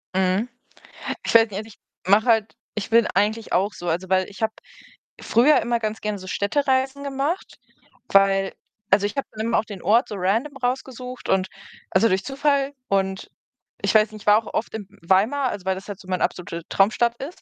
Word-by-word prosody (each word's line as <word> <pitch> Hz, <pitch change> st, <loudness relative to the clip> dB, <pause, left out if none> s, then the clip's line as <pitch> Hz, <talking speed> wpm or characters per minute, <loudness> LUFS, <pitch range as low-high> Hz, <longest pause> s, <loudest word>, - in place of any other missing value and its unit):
Mhm. 190 Hz, +4 st, +1 dB, 0.8 s
Ich -, -, -1 dB
weiß 225 Hz, -1 st, +7 dB
nicht, 195 Hz, -, -6 dB
also, 215 Hz, +1 st, -5 dB
ich -, -, -17 dB, 0.3 s
mache 205 Hz, +3 st, +5 dB
halt 225 Hz, -3 st, +2 dB, 0.2 s
ich 215 Hz, 0 st, -4 dB
bin 230 Hz, -1 st, +5 dB
eigentlich 215 Hz, +3 st, 0 dB
auch 200 Hz, +3 st, +2 dB
so. 175 Hz, -, -8 dB
Also, 180 Hz, +3 st, -1 dB
weil 185 Hz, -1 st, +2 dB
ich 200 Hz, +1 st, -13 dB
habe 220 Hz, 0 st, 0 dB, 0.7 s
früher 255 Hz, +7 st, +4 dB
immer 235 Hz, 0 st, 0 dB
ganz 220 Hz, 0 st, -3 dB
gern 210 Hz, -1 st, -2 dB
so 185 Hz, 0 st, -10 dB
Städtereisen 265 Hz, +6 st, 0 dB
gemacht, 280 Hz, +6 st, -3 dB, 0.5 s
weil 195 Hz, -1 st, +3 dB, 0.4 s
also, 200 Hz, +1 st, +4 dB
ich 205 Hz, -, -4 dB
habe 275 Hz, -, -1 dB
dann 220 Hz, +1 st, -4 dB
eben 230 Hz, -, +1 dB
auch -, -, +2 dB
den 205 Hz, -5 st, -9 dB
Ort 225 Hz, +7 st, +3 dB
so 210 Hz, -, -6 dB
Random 225 Hz, +10 st, 0 dB
rausgesucht 255 Hz, 0 st, -4 dB
und 190 Hz, 0 st, +2 dB, 0.4 s
also, 195 Hz, +4 st, +4 dB
durch 190 Hz, -2 st, +1 dB
Zufall 280 Hz, 0 st, 0 dB
und 190 Hz, -1 st, -1 dB, 0.5 s
ich -, -, +1 dB
weiß 215 Hz, 0 st, +4 dB
nicht, 215 Hz, -1 st, -10 dB
ich -, -, -25 dB
war 210 Hz, +1 st, +7 dB
auch -, -, -11 dB
oft 220 Hz, -, -2 dB
in 205 Hz, -3 st, -6 dB, 0.2 s
Weimar, 225 Hz, +10 st, +2 dB
also 195 Hz, -5 st, -6 dB
weil 190 Hz, 0 st, +1 dB
das 190 Hz, +2 st, -9 dB
halt 200 Hz, -2 st, -6 dB
so 185 Hz, -, -15 dB
meine 185 Hz, -1 st, -1 dB
absolute 170 Hz, -2 st, -3 dB
Traumstadt 235 Hz, +4 st, +2 dB
ist 305 Hz, +7 st, -8 dB
215 Hz, 205 wpm, -23 LUFS, 195-245 Hz, 0.8 s, weiß